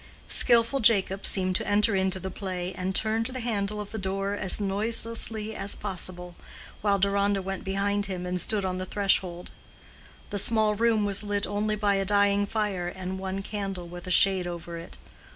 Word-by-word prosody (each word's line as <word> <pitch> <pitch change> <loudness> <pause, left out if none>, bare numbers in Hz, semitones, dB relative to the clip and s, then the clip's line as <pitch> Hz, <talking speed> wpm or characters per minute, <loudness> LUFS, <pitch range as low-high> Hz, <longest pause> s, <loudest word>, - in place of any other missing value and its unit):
Skillful 235 +3 +3
Jacob 200 -4 +3
seemed 185 -1 +3
to - - -3
enter 205 +1 +3
into 190 0 0
the 190 0 -5
play, 185 -1 -4
and 185 +1 -3
turned 220 +1 +1
the 255 0 -5
handle 210 -3 -2
of 205 -1 -6
the 220 - -4
door 195 +1 -2
as 205 -1 +2
noiselessly 220 +2 -1
as 195 +1 0
possible, 180 -3 -5 0.5
while 200 -1 +2
Deronda 200 +1 +1
went 195 0 -5
behind 200 +1 -1
him 180 -2 -4
and 180 0 -1
stood 205 +1 0
on 185 0 -2
the 185 - -3
threshold. 185 -3 0 0.8
The 205 - 0
small 220 0 +4
room 220 -1 +2
was 200 -1 +3
lit 205 -1 -1
only 210 +1 -1
by 205 -1 +1
a 195 - 0
dying 200 0 +3
fire 205 -5 -1
and 185 +1 -5
one 190 +1 -4
candle 195 -4 -5
with 175 +1 -9
a - - -4
shade 185 0 +4
over 170 -1 -6
it. 165 - -10
200 Hz, 185 wpm, -27 LUFS, 185-210 Hz, 0.8 s, small